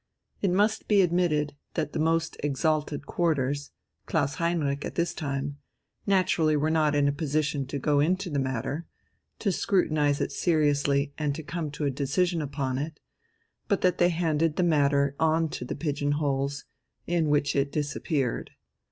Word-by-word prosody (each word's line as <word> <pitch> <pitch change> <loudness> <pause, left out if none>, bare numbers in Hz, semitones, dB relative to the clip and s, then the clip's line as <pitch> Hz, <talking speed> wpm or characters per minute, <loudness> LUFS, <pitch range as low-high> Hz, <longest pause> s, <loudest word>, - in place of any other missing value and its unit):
It 195 - +2
must 205 +4 +1
be 205 -2 +5
admitted 165 -5 +1 0.2
that 155 -2 -2
the - - -2
most 165 +1 +1
exalted 150 0 -1
quarters 145 -4 0 0.4
Klaus 145 -3 +1
Heinrich 150 -5 0
at - - -5
this 170 0 0
time 140 -2 -3 0.5
naturally 170 -5 +3
were 155 +2 +1
not 155 -2 +2
in 145 -1 +3
a - - +3
position 145 -2 -1
to 140 - -3
go 145 +1 +2
into 180 +4 +1
the 145 - 0
matter, 135 +5 -2 0.5
to 200 - 0
scrutinize 155 -6 +1
it - - -1
seriously 145 -3 +1
and 145 -2 0
to 160 - -6
come 155 +1 -4
to 150 +1 -4
a 140 - +1
decision 160 +6 0
upon 135 -3 -2
it, 150 +1 -5 0.7
but 200 - +1
that 180 -1 +2
they 175 - +5
handed 165 -2 +1
the 180 - +1
matter 140 -4 +2
on 160 0 +2
to 125 - -5
the - - -4
pigeon 145 -2 -1
holes, 140 -1 -1 0.4
in 165 -3 +1
which 145 -1 +2
it 140 0 +1
"disappeared." 145 -3 -1
150 Hz, 165 wpm, -27 LUFS, 140-165 Hz, 0.7 s, be